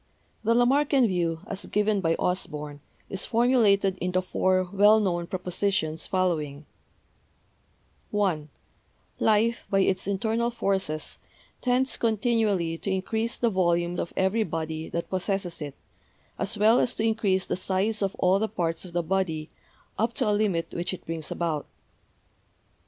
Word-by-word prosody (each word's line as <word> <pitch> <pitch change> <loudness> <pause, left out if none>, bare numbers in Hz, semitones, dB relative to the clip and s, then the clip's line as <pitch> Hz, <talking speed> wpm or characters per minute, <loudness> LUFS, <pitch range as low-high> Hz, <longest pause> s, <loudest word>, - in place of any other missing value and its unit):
The 230 +1 +3
Lamarckian 270 +2 +4
view, 170 -4 -1
as 195 - -5
given 210 -1 +1
by 165 -2 +2
Osborn, 150 -5 -3 0.3
is 195 - -4
formu 245 +3 +3
lated 200 -4 +3
in 180 0 -2
the 185 0 +1
four 185 0 +1
well 205 +2 +6
known 175 -4 -1
propositions 180 -3 -1
following: 155 -6 -1 1.4
(1) 180 -8 0 0.7
Life, 225 +2 +2
by 195 -1 +3
its 190 0 +1
internal 220 +4 0
forces, 190 -9 -2 0.4
tends 255 0 +1
continually 215 -7 +1
to - - -4
increase 220 +5 -1
the 235 -2 +1
volume 175 -2 +1
of - - -3
every 190 +4 +2
body 160 -2 -4
that 170 - -3
possesses 190 -2 -1
it, 145 -2 -5 0.6
as 210 +2 -1
well 220 +4 +5
as 245 - +1
to 220 - -1
increase 210 -4 +1
the - - -1
size 195 +4 0
of 195 -1 -1
all 185 +2 +3
the 220 +1 -1
parts 165 -5 -1
of 180 -2 -11
the 175 0 0
body 165 -3 -1 0.5
up 225 +2 +1
to - - +1
a 210 - +3
limit 205 -5 0
which 175 +2 -2
it - - -16
brings 160 -2 -4
about. 160 -4 -2
190 Hz, 150 wpm, -26 LUFS, 170-215 Hz, 1.4 s, well